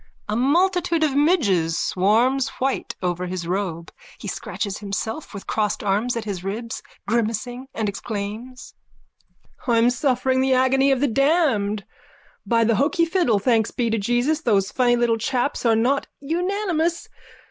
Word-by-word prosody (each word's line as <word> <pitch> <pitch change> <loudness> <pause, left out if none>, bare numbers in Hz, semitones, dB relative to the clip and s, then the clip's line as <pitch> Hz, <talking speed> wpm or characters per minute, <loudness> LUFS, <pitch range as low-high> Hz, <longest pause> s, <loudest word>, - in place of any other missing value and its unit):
_(A 210 - -1
multitude 335 +5 +2
of 300 -3 +2
midges 205 - +2
swarms 235 +8 +2
white 265 +1 -2
over 180 0 -1
his 180 -1 -4
robe. 175 -3 -3 0.3
He - - -8
scratches 200 -2 -4
himself 215 +7 -4
with 200 -2 -8
crossed 210 -1 -1
arms 210 +5 0
at 230 - -3
his 195 -4 -4
ribs, 225 +4 -4 0.3
grimacing, 235 +3 -1
and 220 -2 -1
exclaims:)_ 215 +5 -6 1.0
I'm 230 +1 +4
suffering 260 0 +1
the 265 0 +3
agony 265 +1 +3
of 265 -1 +1
the 285 - +3
damned. 255 - +1 0.6
By 230 -1 +3
the 230 +1 +3
hoky 335 +6 +2
fiddle, 330 - +2
thanks 225 +1 +2
be 235 -2 -1
to 225 - +1
Jesus 240 +9 +1
those 205 -6 +1
funny 245 -2 +3
little 235 -1 +1
chaps 245 +2 -1
are 225 - +4
not 255 +5 +1
unanimous. 340 +1 -1
240 Hz, 145 wpm, -22 LUFS, 210-275 Hz, 1.0 s, I'm